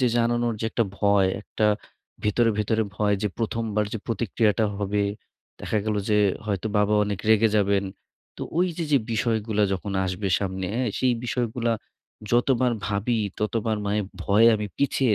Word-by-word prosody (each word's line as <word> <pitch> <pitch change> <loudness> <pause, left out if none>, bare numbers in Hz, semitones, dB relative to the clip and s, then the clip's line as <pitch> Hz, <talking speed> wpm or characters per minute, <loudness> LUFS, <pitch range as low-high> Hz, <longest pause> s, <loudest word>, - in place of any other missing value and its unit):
যে 125 - +4
জানানোর 120 0 +1
যে - - -2
একটা 115 +1 +1
ভয়, 100 -2 +4
একটা 105 - -1 0.6
ভেতরে, 115 +2 +3
ভেতরে 110 +1 +1
ভয় 105 -1 +2
যে 105 - +1
১ম 115 0 -1
বার 105 0 +2
যে 110 - -2
প্রতিক্রিয়াটা 110 0 +1
হবে, 100 0 0 0.6
দেখা 110 - -1
গেল 105 -1 0
যে 105 0 +3 0.3
হয়তো 100 +1 -1
বাবা 105 +1 +3
অনেক 100 -2 -3
রেগে 110 0 +5
যাবেন। 100 -1 +2 0.5
তো - - -6 0.2
ওই 180 - +4
যে 170 - -2
যে 140 - +6
বিষয়গুলা 110 -2 0
যখন 95 +1 -3
আসবে 95 +2 -2
সামনে 95 -1 -3
এ - - +1 0.2
সেই 125 -1 +3
বিষয়গুলা 120 -1 -1 0.6
যতবার 125 0 +3
ভাবি, 110 +3 0 0.2
ততবার 110 0 0
মায়ে 105 +1 +1 0.2
ভয়ে 105 +5 +4
আমি 105 -1 -2
পিছিয়ে 135 -4 +2
110 Hz, 160 wpm, -25 LUFS, 100-115 Hz, 0.6 s, যে